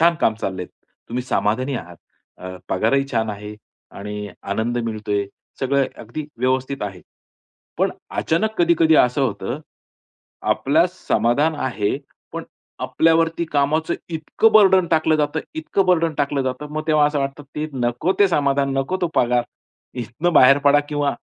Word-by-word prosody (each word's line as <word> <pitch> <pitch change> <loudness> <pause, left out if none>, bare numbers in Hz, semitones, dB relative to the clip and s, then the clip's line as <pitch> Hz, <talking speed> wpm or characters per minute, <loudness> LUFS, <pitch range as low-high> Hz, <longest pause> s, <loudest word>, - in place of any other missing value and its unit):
छान 170 +1 +5
काम 110 - +3
चालले. 95 -2 -3 0.4
तुम्ही 125 +2 -3
समाधानी 130 +3 0
आहात. 85 -4 -8 0.4
अ, 95 0 -7
पगारही 125 +8 +1
छान 110 -1 0
आहे 105 +1 -7 0.4
आणि 105 +1 -5 0.2
आनंद 115 +4 -1
मिळतोय. 105 -2 -2 0.3
सगळं 135 0 +2
अगदी 120 +7 -6
व्यवस्थित 130 +1 -1
आहे. 95 -3 -5 0.8
पण - - +2 0.3
अचानक 215 +7 0
कधी-कधी 165 -2 +4
असं 125 +2 +3
होतं, 120 +2 -2 0.9
आपला 155 +6 +3
समाधान 145 - +1
आहे, 120 -8 -1 0.4
पण - - -5 0.4
आपल्यावरती 165 +1 +2
कामाचं 150 +3 +1
इतकं 165 +7 +1
बर्डन 190 -4 +6
टाकलं 155 -1 +3
जातं, 150 +1 0
इतकं 185 +4 0
बर्डन 165 -3 +2
टाकलं 140 -1 0
जातं. 130 +3 -3
मग 155 0 -2
तेव्हा 150 -1 +4
असं 150 -1 -1
वाटतं 135 +1 -4
ते 155 +1 -1
नको 120 +7 0
ते 200 - +6
समाधान 140 -3 +1
नको, 135 +8 -1
तो 175 - +2
पगार. 120 0 +3 0.5
इथनं 125 +8 -2
बाहेर 135 0 +7
पडा 145 +1 +6
किंवा 145 -2 0
140 Hz, 145 wpm, -21 LUFS, 120-160 Hz, 0.9 s, बाहेर